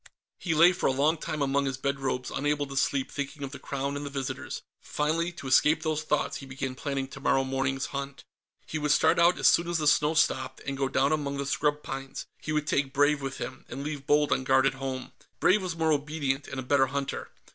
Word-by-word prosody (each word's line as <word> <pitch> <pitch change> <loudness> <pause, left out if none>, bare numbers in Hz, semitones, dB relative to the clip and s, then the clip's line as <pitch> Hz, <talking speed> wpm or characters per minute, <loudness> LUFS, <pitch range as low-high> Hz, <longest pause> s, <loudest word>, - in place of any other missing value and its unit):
He 165 -3 -1
lay 170 +3 +7
for 180 - 0
a - - +3
long 145 +5 +2
time 155 -1 -3
among 140 0 +1
his 135 -1 -2
bed 140 +1 -2
robes, 130 -1 -2
unable 145 +1 0
to 135 -1 -8
sleep, 135 0 0
thinking 145 +1 -5
of 135 - -5
the 140 - -8
Crown 140 +1 -3
and 145 - -4
the 145 - -4
visitors. 135 -2 -5 0.2
Finally, 165 +3 -1
to 175 -4 -10
escape 150 +4 +4
those 155 -1 0
thoughts, 150 -1 -1
he 135 - -10
began 130 0 -4
planning 135 0 -3
tomorrow 135 0 +1
morning's 135 0 -1
hunt. 140 0 -5 0.4
He 160 - -4
would 150 0 -1
start 160 +3 +4
out 170 +1 +5
as - - -3
soon 170 - +5
as 175 - +1
the 155 - -1
snow 150 +1 +3
stopped, 130 -3 +1
and 140 - -2
go 135 0 -1
down 135 +2 +2
among 145 -2 -1
the 140 - -2
scrub 150 +1 0
pines; 135 0 -6
he 155 - -5
would 150 -1 0
take 135 -2 0
Brave 145 +1 +3
with 135 -1 -4
him, 130 - -6
and 140 - -5
leave 145 -2 -5
Bold 150 0 +3
on 130 - +2
guard 130 0 +4
at 135 - +3
home. 135 -1 -5 0.3
Brave 200 +3 +4
was 180 -3 -4
more 160 -1 +2
obedient, 145 -2 -1
and 135 - -5
a - - -4
better 135 +1 +3
hunter. 140 +1 -3
140 Hz, 235 wpm, -28 LUFS, 135-150 Hz, 0.4 s, lay